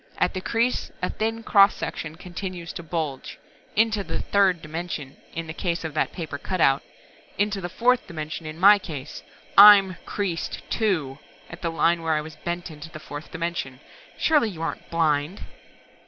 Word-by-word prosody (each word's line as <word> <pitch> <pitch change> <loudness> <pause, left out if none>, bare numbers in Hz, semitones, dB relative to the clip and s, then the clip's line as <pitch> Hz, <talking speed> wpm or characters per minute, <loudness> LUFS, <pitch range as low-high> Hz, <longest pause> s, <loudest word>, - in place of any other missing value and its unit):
At - - +1
the 185 - -3
crease 235 +5 0
a - - 0
thin 225 +1 -2
cross 200 -2 +5
section 155 -1 -5
continues 180 0 -6
to - - -6
bulge 160 -5 -4 0.4
into 215 -1 +2
the - - -4
third 195 -3 +2
dimension 155 -3 -5 0.2
in 165 0 -3
the 160 - -6
case 170 -1 -2
of 160 -2 -4
that 155 - 0
paper 155 -5 -6
cutout. 140 -7 +2 0.6
Into 205 0 0
the 175 - -4
fourth 250 +6 +2
dimension 155 0 -6
in 155 +1 -8
my 205 +2 +8
case! 150 -6 -7 0.4
I'm 200 -3 +9
creased 185 -5 -3
too, 160 - 0 0.3
at 165 - -10
the 170 - -1
line 165 +1 +2
where 165 -1 0
I 150 - 0
was 155 0 -10
bent 175 0 -5
into 150 +1 -10
the 160 -2 -9
fourth 145 0 -9
dimension! 165 -6 -4 0.4
Surely 295 -8 +3
you 165 -5 -7
aren't 165 - -5
blind?" 160 +1 0
170 Hz, 170 wpm, -25 LUFS, 155-195 Hz, 0.6 s, I'm